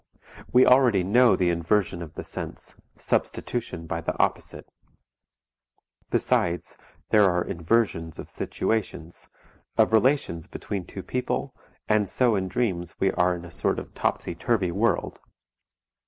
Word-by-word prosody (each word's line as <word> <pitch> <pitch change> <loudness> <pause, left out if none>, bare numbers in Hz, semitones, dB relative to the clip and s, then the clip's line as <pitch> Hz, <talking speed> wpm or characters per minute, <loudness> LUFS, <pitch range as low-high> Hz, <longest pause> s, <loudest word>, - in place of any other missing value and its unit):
We 125 +1 +6
already 125 -7 +5
know 120 +5 +5
the 90 -1 +2
inversion 85 +1 0
of 80 -3 -9
the - - -5
sense, - - -7 0.2
substitution 90 -9 -2
by 80 +1 -3
the - - -3
opposite. - - -1 1.4
Besides 85 0 0 0.4
there 105 -3 +6
are 90 -1 +1
inversions 85 -3 0
of - - -8
situations, 90 -6 -3 0.5
of - - +4
relations 110 - +2
between 95 -4 -5
two 95 - -8
people, 125 0 -2 0.3
and 105 -2 +2
so 120 -4 +2
in 95 -1 -1
dreams 90 -6 -2
we 95 - +2
are 90 0 +2
in 85 0 -8
a 85 - -11
sort - - -1
of - - -7
topsy - - -1
turvy 95 0 0
world. 105 +2 0
95 Hz, 135 wpm, -25 LUFS, 85-115 Hz, 1.4 s, We